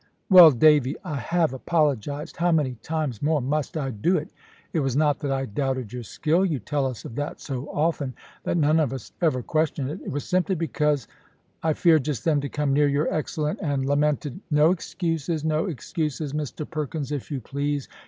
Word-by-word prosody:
"Well, 180 -3 +11
Davy, 145 -1 +4
I 150 - -4
have 165 +3 0
apologised. 145 0 -1
How 175 +1 +2
many 150 -6 +2
times 155 -8 -3
more 155 +1 +2
must 145 +4 -2
I 135 -3 -2
do 150 - +1
it? 155 +1 -5 0.4
It 165 - +1
was 135 -4 0
not 150 0 +2
that 145 - -3
I 135 0 0
doubted 130 -1 -2
your 125 - -4
skill. 155 - 0
You 170 -7 +1
tell 135 +4 -1
us 125 -5 -6
of - - -7
that 145 +1 -3
so 135 -1 -5
often, 145 -4 -1 0.3
that - - 0
none 155 0 +3
of 140 -5 +1
us 130 -4 -7
ever 150 -7 +1
question 155 -2 0
it. - - -7
It - - -7
was 145 +1 -3
simply 185 +1 +1
because 150 - 0 0.5
I 160 -1 +1
feared 160 -2 +4
just 150 -5 -3
then 155 -3 +3
to 140 - -4
come 145 -2 0
near 145 +1 +4
your 145 +3 +1
excellent 155 +3 -2
and 140 -6 -1
lamented 145 +1 0
" - - -41
"No 150 +1 +5
excuses, 165 -3 -2
no 155 0 +1
excuses, 155 -2 -3
Mr 150 0 -4
Perkins, 150 -2 -4
if 145 -3 -4
you 140 -3 -3
please! 140 +3 -3
150 Hz, 200 wpm, -25 LUFS, 135-160 Hz, 0.5 s, Well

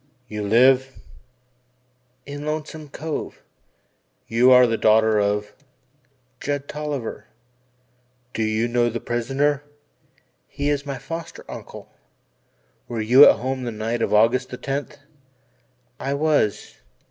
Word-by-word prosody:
"You 105 -1 -5
live 130 +5 +3 0.6
" 125 0 -43
"In 145 +1 -7
Lonesome 155 0 -5
Cove." 155 +3 -6 0.8
"You 120 +3 +4
are 125 0 +8
the 115 -1 0
daughter 110 0 +3
of 105 0 -1 0.4
" 130 -1 -42
"Judd 145 -1 -3
Tolliver." 150 -5 -5 1.1
"Do - - -3
you 110 +1 0
know 120 0 +1
the 115 +1 -4
prisoner?" 135 +5 -1 0.8
"He 145 +1 -2
is 145 0 -2
my 140 -1 -4
foster 165 +3 -8
uncle." - - -10 1.0
"Were 115 - -4
you 125 +6 +7
at - - +4
home 130 +2 -3
on 125 - -5
the 120 - -3
night 115 +2 -3
of - - 0
August 115 +4 +3
the 125 - -7
tenth?" 140 +2 -4 1.0
"I 140 +1 -2
was." 145 -8 0
125 Hz, 130 wpm, -22 LUFS, 115-140 Hz, 1.1 s, are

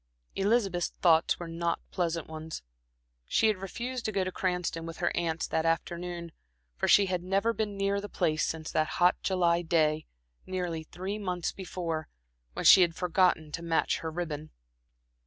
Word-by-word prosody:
Elizabeth's 195 -4 +1
thoughts 165 -2 +4
were 175 - -6
not 170 +1 -1
pleasant 170 -2 -1
ones. 160 - -7 0.6
She - - +2
had 215 - +1
refused 235 +6 -5
to 215 - 0
go 195 -2 +1
to 185 - -3
Cranston 180 -3 -2
with 165 - -7
her 175 - 0
aunts 165 -1 -1
that 160 - +1
afternoon, 170 +1 -2 0.4
for - - -1
she 200 - +6
had 180 -2 -1
never 195 +5 +1
been 210 -3 -3
near 200 0 0
the 205 - -7
place 155 -3 0
since 160 -1 -3
that 155 0 0
hot 180 +1 +5
July 175 -2 +2
day, 155 -2 +1 0.4
nearly 180 -3 -2
three 190 +6 -5
months 180 -4 -2
before, 170 -4 -4 0.5
when - - -4
she 190 - +10
had 170 -2 +3
forgotten 180 -4 +2
to 165 - -4
match 165 -1 +1
her 160 - -4
ribbon. 155 -2 -4
175 Hz, 170 wpm, -29 LUFS, 165-190 Hz, 0.6 s, she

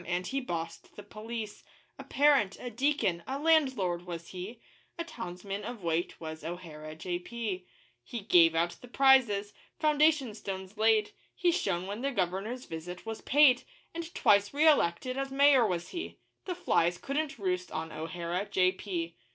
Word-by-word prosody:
and 180 +1 -1
he 275 +1 -2
bossed 165 -7 -5
the 205 - -9
police; 215 +1 -7 0.4
A - - -6
parent, 280 -9 +3
a 245 - -6
deacon, 235 -8 +1
a 270 - -2
landlord 260 - +2
was 170 -1 -6
he 195 +6 -7 0.4
A 335 - -2
townsman 200 - -6
of 230 -2 -7
weight 170 +1 -1
was 160 -1 -7
O'Hara, 155 -2 -7
J.P. 180 +3 -4 0.4
He 235 - -6
gave 170 -5 +5
out 170 +1 +2
the 250 - -11
prizes, 240 -6 +4 0.3
foundation 300 -5 +3
stones 195 -1 -6
laid, 220 -1 +3 0.2
He 355 -1 +2
shone 190 - -1
when 205 +4 -5
the 275 - 0
Governor's 205 +3 -2
visit 175 +3 -7
was 225 0 -5
paid; 275 -3 +5 0.3
And 335 0 -6
twice 205 +5 +3
re 310 +2 +4
elected 255 - +3
as 275 0 -2
Mayor 270 -3 +5
was 175 -3 -3
he 345 - -6 0.3
The 360 - -3
flies 175 - +2
couldn't 285 - -3
roost 180 -3 -2
on 160 +1 -4
O'Hara, 170 +4 -4
J.P. 185 -2 0
205 Hz, 160 wpm, -30 LUFS, 175-265 Hz, 0.4 s, gave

